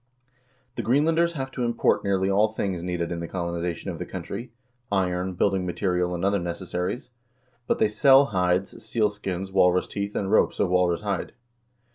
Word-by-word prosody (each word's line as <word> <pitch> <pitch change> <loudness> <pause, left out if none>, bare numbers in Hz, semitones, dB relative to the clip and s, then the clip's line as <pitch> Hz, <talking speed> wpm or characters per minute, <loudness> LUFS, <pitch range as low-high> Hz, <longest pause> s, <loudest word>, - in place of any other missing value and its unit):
The - - 0
Greenlanders 160 +9 +2
have 135 -4 -4
to 125 - -3
import 120 -1 +1
nearly 95 -1 +1
all 100 +2 +4
things 100 -5 -3
needed 90 -1 -3
in 85 - -3
the 85 - -4
colonization 85 -1 -3
of - - -8
the - - -4
country: 115 +4 -6 0.4
iron, 90 -1 0
building 95 0 +1
material, 90 0 -1
and 85 +2 -2
other 100 0 +2
necessaries; 90 +6 -4 0.6
but - - +1
they - - +3
sell 135 +6 +6
hides, 90 0 0
seal 110 -1 +1
skins, 95 -2 -5
walrus 90 -1 +3
teeth, 100 0 -4
and 95 -1 -1
ropes - - +3
of - - +2
walrus 90 -1 +2
hide." 100 -3 -3
95 Hz, 170 wpm, -25 LUFS, 90-105 Hz, 0.6 s, sell